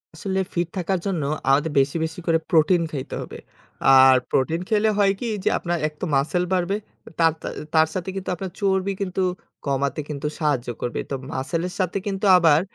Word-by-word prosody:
আসলে 190 +4 -2
ফিট 175 -1 0
থাকার 185 +1 0
জন্য 175 -7 -1 0.3
আমাদের 145 +3 +3
বেশি 140 +4 +1
বেশি 160 +2 -7
করে 165 -1 +4
প্রোটিন 170 +2 +4
খাইতে 135 -4 -5
হবে। - - -8 0.6
আর 130 0 +8 0.2
প্রোটিন 160 +6 +1
খেলে 215 0 +3
হয় 200 -1 +4
কি? 245 - -3 0.2
যে - - +3
আপনার 175 0 -2
এক 150 - -9
তো - - 0
মাসল 155 +6 +1
বাড়বে, 185 +2 +1 0.4
তার 165 -1 +4 0.4
তার 160 0 +5
সাথে 185 0 -3
কিন্তু 190 -1 -4
আপনার 190 +1 -6
চর্বি 195 0 +1
কিন্তু 190 -1 -2 0.4
কমাতে 140 +1 -1
কিন্তু 150 0 -3
সাহায্য 145 -6 0
করবে। 120 - -2
তো - - 0 0.2
মাসলের 165 +7 -2
সাথে 185 +1 0
কিন্তু 195 0 -2
আবার 160 -3 +5
170 Hz, 180 wpm, -23 LUFS, 150-190 Hz, 0.6 s, আর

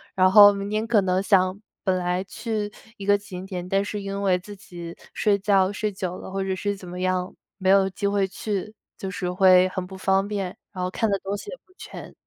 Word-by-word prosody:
然 185 0 +5
后 205 0 +10
明 200 0 -4
天 215 +1 -1
可 220 -4 +4
能 185 0 +1
想 190 0 +2 0.2
本 190 -2 +2
来 180 +1 -1
去 215 +1 -4 0.3
一 195 - -7
个 205 0 +5
景 190 -2 -7
点， 180 -2 -5
但 195 +1 +1
是 205 -1 -4
因 200 0 -4
为 185 -2 +3
自 205 +3 -10
己 175 -3 -9 0.2
睡 205 -2 +2
觉 195 -1 +3
睡 210 0 -2
久 185 -2 -4
了 - - -9
或 195 0 -2
者 190 -1 -1
是 205 +2 -2
怎 185 -2 -11
么 180 +1 -6
样， 185 0 -1 0.3
没 185 0 +1
有 195 0 +5
机 200 +2 -2
会 200 -1 +1
去， 205 +1 -4 0.2
就 190 -1 -5
是 180 -1 -3
会 185 0 +5
很 185 -1 -4
不 190 +1 -10
方 195 +1 +1
便， 195 -3 -4 0.2
然 185 -2 -4
后 180 - -1
看 225 +4 0
得 195 - +1
东 200 +1 -3
西 415 - -8
也 - - -6
不 370 - -28
全。 - - -10
195 Hz, 255 characters per minute, -24 LUFS, 185-205 Hz, 0.3 s, 后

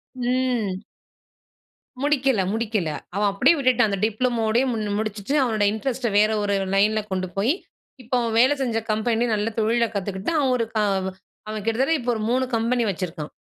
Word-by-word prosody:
ம். 245 -6 -1 1.2
முடிக்கல 275 -6 +2
முடிக்கல, 215 -7 -1 0.3
அவன் 205 0 +2
அப்படியே 265 +12 +4
விட்டுட்டான், 250 -5 +3
அந்த 200 - -2
டிப்ளோமாவோட 225 0 +1 0.4
முடிச்சிட்டு, 215 +3 -3
அவனுடைய 215 -4 +1
இன்ட்ரெஸ்ட் 240 +3 -2
வேற 210 +1 +5
ஒரு 200 0 +1 0.2
லைன்ல 215 +2 +3
கொண்டு 185 -1 -2
போய், 225 +10 +2 0.5
இப்போ 250 +2 -2
அவன் 230 -1 -1
வேலை 260 +4 +5
செஞ்ச 235 -4 0
கம்பெனி 225 +2 +1
நல்ல 215 +1 -1
தொழில 230 +2 +2
கத்துக்கிட்டு, 195 - -2
அவன், 215 -7 0 0.4
அவன் 215 -2 -4
கிட்டத்தட்ட 250 +2 +1
ஒரு 220 - -3
3 255 +2 +2
கம்பெனி 235 +1 +1
வச்சிருக்கான். 165 -4 -5
225 Hz, 140 wpm, -23 LUFS, 205-250 Hz, 1.2 s, வேற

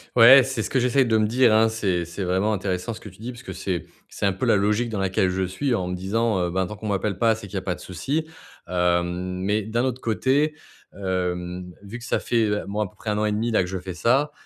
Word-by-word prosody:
Ouais, 125 +3 +9
c'est 130 -3 -2
ce - - -3
que 135 - +1
j'essaye 125 +1 +3
de 110 -1 +3
me 110 - +3
dire, 120 +2 +4
hein, 110 +1 +5
c'est 95 -6 -1
c'est 85 +3 -5
vraiment 95 +4 +1
intéressant 95 +1 -2
ce - - -9
que 105 - -10
tu 95 - -19
dis 120 +3 -5
puisque 115 -6 -9
c'est 90 -1 -3 0.2
c'est - - -1
un - - +3
peu 95 - -3
la - - +4
logique 105 +4 +1
dans 105 -3 -3
laquelle 95 -1 +1
je 95 +1 -1
suis 95 +9 -1
en 90 -5 -1
me 90 - -2
disant: 105 +3 0
«Heu, 90 -1 0
ben, 95 +1 0
tant 105 - -7
qu'on 105 +1 -7
m'appelle 100 -1 -1
pas, 115 -1 +4
c'est 105 -2 -8
qu'il 100 - -10
y - - 0
a 95 - -1
pas 90 -1 -1
de 90 - -10
souci», 140 - -3 0.4
hem, 90 +1 0
mais 105 +3 0
d'un 115 +4 -1
autre 130 0 -2
côté, 135 +7 +1 0.4
hem, 90 -2 -3
vu 105 +4 -8
que 120 - -10
ça - - 0
fait, 115 -3 +1 0.2
bon, 105 +2 -2
à 105 - 0
peu - - -21
près 110 - -6
1 105 - 0
an 105 - +1
et 105 - +1
demi 110 +3 0
là 110 - +2
que - - -5
je 95 0 -3
fais 90 0 -7
ça, 135 +10 +2
105 Hz, 280 wpm, -24 LUFS, 90-115 Hz, 0.4 s, Ouais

